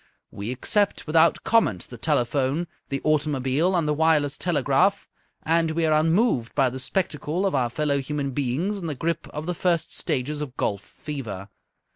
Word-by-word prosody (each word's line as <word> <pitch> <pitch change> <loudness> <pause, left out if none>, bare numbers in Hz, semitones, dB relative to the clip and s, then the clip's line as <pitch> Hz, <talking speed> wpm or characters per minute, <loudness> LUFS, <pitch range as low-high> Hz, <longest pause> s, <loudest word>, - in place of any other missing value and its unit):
We 100 +3 -6
accept 200 - 0
without 160 +1 +3
comment 165 - +2
the 120 - -9
telephone, 140 +3 0 0.2
the 135 -1 -2
automobile, 150 +2 +1
and 165 -3 +1
the 150 - +2
wireless 150 -2 +2
telegraph, 175 +5 +1 0.4
and 165 0 +2
we 165 +1 0
are 155 - +3
unmoved 165 - +1
by 130 -2 +3
the 130 - -6
spectacle 155 +4 -1
of 195 - +1
our 125 -4 +1
fellow 145 +2 0
human 140 0 -3
beings 145 +10 -1
in 170 - -5
the 150 - -3
grip 165 +4 -2
of 150 +1 -6
the 180 - -1
first 170 -2 0
stages 145 +3 -1
of 140 -3 -6
golf 100 -1 -1
fever. 110 -9 -7
150 Hz, 170 wpm, -24 LUFS, 130-165 Hz, 0.4 s, without